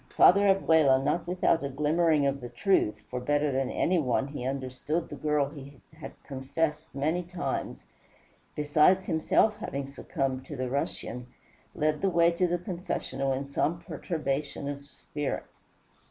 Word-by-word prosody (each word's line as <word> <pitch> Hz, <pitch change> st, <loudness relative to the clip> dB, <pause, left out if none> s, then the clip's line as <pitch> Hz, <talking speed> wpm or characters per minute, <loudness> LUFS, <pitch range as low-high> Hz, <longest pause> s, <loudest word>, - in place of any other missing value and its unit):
Father 200 Hz, +2 st, +6 dB
Abella, 160 Hz, -8 st, +5 dB
not 170 Hz, +5 st, 0 dB
without 175 Hz, -3 st, +2 dB
a 140 Hz, -, -2 dB
glimmering 150 Hz, +2 st, +2 dB
of 140 Hz, 0 st, 0 dB
the 120 Hz, -, -6 dB
truth, 190 Hz, -, +1 dB
for 125 Hz, -, -2 dB
better 145 Hz, +3 st, +1 dB
than 130 Hz, -1 st, 0 dB
any 180 Hz, 0 st, +1 dB
one 130 Hz, -1 st, 0 dB
he 145 Hz, -3 st, -6 dB
understood 135 Hz, +5 st, -3 dB
the 145 Hz, -, -7 dB
girl 150 Hz, -1 st, +1 dB
he 140 Hz, -2 st, -11 dB
had 155 Hz, 0 st, -9 dB
confessed 150 Hz, +3 st, -3 dB
many 155 Hz, +6 st, 0 dB
times, 175 Hz, -5 st, -4 dB, 0.7 s
besides 155 Hz, +6 st, +3 dB
himself 210 Hz, +6 st, +2 dB
having 140 Hz, 0 st, -4 dB
succumbed 135 Hz, -1 st, -3 dB
to 150 Hz, -, -6 dB
the 130 Hz, -1 st, -3 dB
Russian, 125 Hz, -2 st, -3 dB, 0.5 s
led 150 Hz, 0 st, 0 dB
the 195 Hz, -, +2 dB
way 170 Hz, -1 st, +4 dB
to 180 Hz, +2 st, +1 dB
the 175 Hz, +1 st, 0 dB
confessional 170 Hz, -7 st, -3 dB
in 135 Hz, +1 st, -2 dB
some 155 Hz, +4 st, 0 dB
perturbation 145 Hz, -3 st, -3 dB
of 140 Hz, 0 st, -6 dB
spirit. 145 Hz, 0 st, -4 dB
145 Hz, 155 wpm, -28 LUFS, 135-170 Hz, 0.7 s, Father